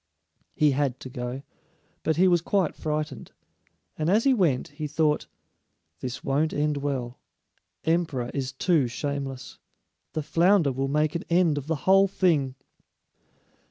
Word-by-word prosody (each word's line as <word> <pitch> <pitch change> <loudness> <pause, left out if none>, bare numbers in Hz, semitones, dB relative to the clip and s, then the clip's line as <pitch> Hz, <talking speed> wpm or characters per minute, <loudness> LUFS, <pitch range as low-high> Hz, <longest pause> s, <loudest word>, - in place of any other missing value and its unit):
He 150 -1 +4
had 135 -2 0
to 130 - -7
go, 125 +1 -5 0.6
but 160 - 0
he 185 +4 +4
was 175 -2 +4
quite 190 -1 +1
frightened. 155 0 -4 0.6
And 155 +1 -1
as 210 +4 +4
he 275 - +4
went, 170 - +1
he 150 +1 -5
thought, 150 0 +1 0.7
"This 125 +2 -5
won't 145 +3 +1
end 150 0 0
well; 135 -4 -3 0.6
emperor 160 -7 0
is 135 -2 -2
too 145 -1 +2
shameless. 135 +1 -5 0.5
The 155 - -2
flounder 170 +1 +3
will 135 +1 -2
make 150 +2 +1
an 170 - -3
end 170 -4 +3
of 140 - -10
the 160 - 0
whole 195 +1 +6
thing." 155 -9 +1
150 Hz, 145 wpm, -26 LUFS, 135-170 Hz, 0.7 s, whole